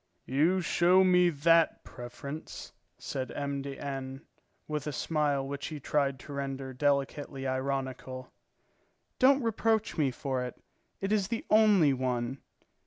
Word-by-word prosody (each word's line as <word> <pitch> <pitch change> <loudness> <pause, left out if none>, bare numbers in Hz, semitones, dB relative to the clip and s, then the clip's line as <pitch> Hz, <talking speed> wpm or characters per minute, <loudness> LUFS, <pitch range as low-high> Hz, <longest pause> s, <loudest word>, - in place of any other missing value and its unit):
"You 160 +8 +2
show 180 +2 +4
me 180 -1 +5
that 165 +2 +3
preference?" 140 +5 -8 0.2
said 130 -2 -4
M. 140 -1 -2
de 140 0 -6
N., 135 -1 -5 0.5
with 150 -1 -3
a - - -1
smile 145 -2 0
which 140 +1 -4
he 155 -2 -6
tried 140 -1 0
to 145 - -9
render 135 -1 -4
delicately 140 0 -1
ironical. 130 -1 -3 0.9
"Don't 270 +1 +5
reproach 225 -3 0
me 145 -3 +3
for 130 0 -3
it. 125 - -7 0.4
It 195 +1 -2
is 205 -3 +2
the 230 +1 -3
only 210 -9 +5
one." 125 0 -2
140 Hz, 135 wpm, -30 LUFS, 135-170 Hz, 0.9 s, me